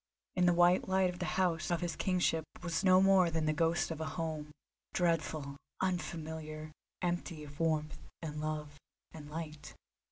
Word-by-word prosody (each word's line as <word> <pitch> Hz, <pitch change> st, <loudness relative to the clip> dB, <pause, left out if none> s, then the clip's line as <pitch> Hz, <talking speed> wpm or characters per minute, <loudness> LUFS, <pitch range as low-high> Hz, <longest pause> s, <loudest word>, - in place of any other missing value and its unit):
In 180 Hz, -1 st, +4 dB
the 175 Hz, -, +6 dB
white 175 Hz, +1 st, +5 dB
light 185 Hz, -1 st, +2 dB
the 180 Hz, -, -1 dB
house 170 Hz, -4 st, +1 dB
of 175 Hz, -1 st, +1 dB
his 170 Hz, -3 st, -2 dB
kingship 175 Hz, -2 st, +1 dB, 0.2 s
was 170 Hz, 0 st, -1 dB
no 185 Hz, 0 st, +6 dB
more 190 Hz, -2 st, +6 dB
than 160 Hz, -1 st, 0 dB
the 155 Hz, -, +2 dB
ghost 165 Hz, +2 st, +1 dB
of 160 Hz, -1 st, -4 dB
a 160 Hz, -, -2 dB
home, 155 Hz, -2 st, -3 dB, 0.5 s
dreadful, 160 Hz, -5 st, 0 dB, 0.2 s
unfamiliar, 160 Hz, -4 st, -3 dB, 0.3 s
empty 175 Hz, -3 st, -2 dB
of 145 Hz, 0 st, -11 dB
warmth 155 Hz, -2 st, 0 dB, 0.2 s
and 150 Hz, -2 st, -5 dB
love 150 Hz, -1 st, -4 dB, 0.3 s
and 150 Hz, -2 st, -9 dB
light. 155 Hz, -1 st, -7 dB
165 Hz, 160 wpm, -34 LUFS, 155-175 Hz, 0.5 s, the